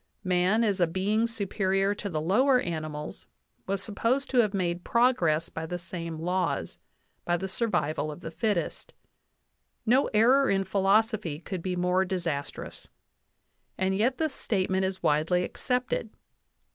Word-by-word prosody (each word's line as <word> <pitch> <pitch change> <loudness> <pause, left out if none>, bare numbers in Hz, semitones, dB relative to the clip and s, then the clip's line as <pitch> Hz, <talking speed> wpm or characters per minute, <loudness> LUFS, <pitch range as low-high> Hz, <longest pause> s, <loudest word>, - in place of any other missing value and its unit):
Man, 185 +4 +2
as 205 -3 +1
a 175 - +4
being 205 +6 +1
superior 195 -2 0
to 205 0 -5
the 155 -4 -2
lower 250 - +3
animals, 155 -6 -5 0.4
was 195 0 -1
supposed 230 +6 -1
to 255 - +3
have 215 -4 +4
made 175 -3 -1
progress 175 -10 +2
by 160 0 -5
the 175 - -3
same 170 -1 -6
laws 180 +2 -2 0.4
by 175 0 +1
the 190 - -4
survival 155 -9 -1
of 150 - -10
the 160 - -6
fittest. 200 0 -2 0.9
No 255 +5 +4
error 255 +6 +4
in 195 0 +2
philosophy 195 -3 +1
could 185 +1 -5
be 180 +1 -2
more 180 +1 +2
disastrous. 170 -6 -4 0.9
And 190 0 +1
yet 245 +6 +1
this 315 -3 -1
statement 190 -5 0
is 190 -1 -4
widely 160 +3 +2
accepted. 250 +1 -2
190 Hz, 145 wpm, -28 LUFS, 170-220 Hz, 0.9 s, a